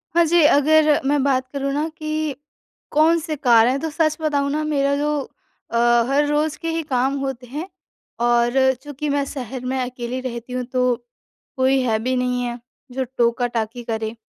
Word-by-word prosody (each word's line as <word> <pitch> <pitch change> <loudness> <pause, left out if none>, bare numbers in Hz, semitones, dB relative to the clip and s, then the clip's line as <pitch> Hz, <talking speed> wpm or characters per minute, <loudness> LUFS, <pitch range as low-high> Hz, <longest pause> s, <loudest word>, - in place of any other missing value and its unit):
हाँ 340 - +6
जी, 340 +1 +4
अगर 305 +1 +4
मैं 285 0 +2
बात 260 -2 +1
करूँ 275 0 -2
ना 300 +3 0
कि 310 -2 -2 0.6
कौन-से 315 +1 +2
कार्य 240 -5 +5
है, 275 - -1
तो 320 +2 -3
सच 310 0 0
बताऊँ 285 -2 0
ना 305 +1 -1
मेरा 280 -2 +1
जो 295 +1 0 0.6
अ, 235 - 0 0.3
हर 285 +2 +3
रोज़ 300 +1 0
के 330 - -2
ही 325 0 -1
काम 260 +2 +2
होते 265 -2 -4
हैं 300 +9 -5 0.6
और 240 0 +3 0.3
चूँकि 290 0 -5
मैं 285 0 +1
शहर 255 -2 -6
में 260 +1 -1
अकेली 250 0 -4
रहती 245 -1 -6
हूँ 255 - -2
तो 250 -1 +2 0.6
कोई 265 +1 +3
है 225 -3 +1
भी 255 +3 -1
नहीं 250 0 0
है, 240 0 -4 0.3
जो 260 +1 -2
टोका-टाकी 235 -1 0
करें। 220 0 -3
270 Hz, 175 wpm, -21 LUFS, 245-300 Hz, 0.6 s, हाँ